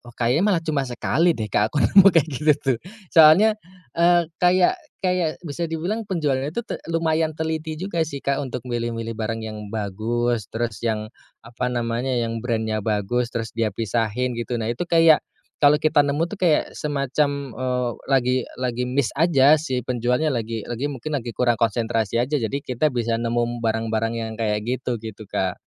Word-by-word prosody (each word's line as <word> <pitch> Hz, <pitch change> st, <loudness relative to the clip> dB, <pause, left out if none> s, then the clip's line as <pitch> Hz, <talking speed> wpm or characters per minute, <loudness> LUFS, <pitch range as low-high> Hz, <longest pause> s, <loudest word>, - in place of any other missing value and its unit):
kayaknya 125 Hz, -, +2 dB
malah 180 Hz, -5 st, +1 dB
cuma 145 Hz, -5 st, -1 dB
sekali 155 Hz, +7 st, +1 dB
deh 110 Hz, -3 st, -5 dB
Kak 105 Hz, +2 st, +3 dB
aku 145 Hz, -, +1 dB
nemu 195 Hz, 0 st, +7 dB
kayak 165 Hz, -1 st, +4 dB
gitu 150 Hz, +4 st, +3 dB
tuh. 135 Hz, -4 st, -1 dB, 0.3 s
Soalnya 185 Hz, +8 st, +6 dB, 0.3 s
eee, 175 Hz, 0 st, +4 dB, 0.2 s
kayak 180 Hz, -, +3 dB, 0.2 s
kayak 180 Hz, -4 st, 0 dB
bisa 170 Hz, +1 st, -4 dB
dibilang 175 Hz, +8 st, -3 dB
penjualannya 150 Hz, -6 st, -1 dB
tuh 235 Hz, -, 0 dB
te -, -, -5 dB
lumayan 160 Hz, -1 st, 0 dB
teliti 160 Hz, 0 st, -3 dB
juga 170 Hz, +1 st, -4 dB
sih 140 Hz, -3 st, -7 dB
Kak 140 Hz, 0 st, +1 dB
untuk 125 Hz, -3 st, -5 dB
milih-milih 115 Hz, -2 st, -3 dB
barang 115 Hz, 0 st, -3 dB
yang 105 Hz, -1 st, -6 dB
bagus, 110 Hz, +2 st, -1 dB
terus 115 Hz, -2 st, -3 dB
yang 110 Hz, -1 st, -1 dB, 0.3 s
apa 120 Hz, +2 st, -4 dB
namanya 120 Hz, +2 st, -1 dB
yang 115 Hz, -1 st, -1 dB
brand-nya 110 Hz, -2 st, -1 dB
bagus, 110 Hz, +3 st, -1 dB
terus 115 Hz, -1 st, -3 dB
dia 110 Hz, -3 st, -1 dB
pisahin 115 Hz, +2 st, -1 dB
gitu. 120 Hz, +1 st, -3 dB
Nah 110 Hz, -, -1 dB
itu 150 Hz, +9 st, -4 dB
kayak 165 Hz, -2 st, +6 dB, 0.4 s
kalau 145 Hz, 0 st, +6 dB
kita 155 Hz, -1 st, +3 dB
nemu 145 Hz, +3 st, 0 dB
tuh 210 Hz, -, -6 dB
kayak 170 Hz, -5 st, +2 dB
semacam, 140 Hz, -1 st, -1 dB
eee, 125 Hz, 0 st, -1 dB, 0.2 s
lagi 130 Hz, -2 st, +2 dB, 0.2 s
lagi 125 Hz, -1 st, -2 dB
missed 130 Hz, -3 st, 0 dB
aja 155 Hz, -2 st, +5 dB
si 130 Hz, -6 st, -2 dB
penjualnya 125 Hz, +5 st, 0 dB
lagi 115 Hz, -3 st, -3 dB
lagi 120 Hz, +4 st, -3 dB
mungkin 145 Hz, +2 st, -6 dB
lagi 120 Hz, -2 st, -6 dB
kurang 120 Hz, -3 st, +1 dB
konsentrasi 115 Hz, -1 st, 0 dB
aja. 145 Hz, +3 st, -1 dB
Jadi 135 Hz, +5 st, -3 dB
kita 130 Hz, +5 st, 0 dB
bisa 120 Hz, -4 st, -1 dB
nemu 120 Hz, 0 st, -1 dB
barang-barang 115 Hz, 0 st, -1 dB
yang 115 Hz, -1 st, -4 dB
kayak 105 Hz, -2 st, 0 dB
gitu, 125 Hz, +1 st, -2 dB
gitu 110 Hz, -2 st, -9 dB
Kak. 95 Hz, -1 st, -2 dB
125 Hz, 175 wpm, -23 LUFS, 115-155 Hz, 0.4 s, nemu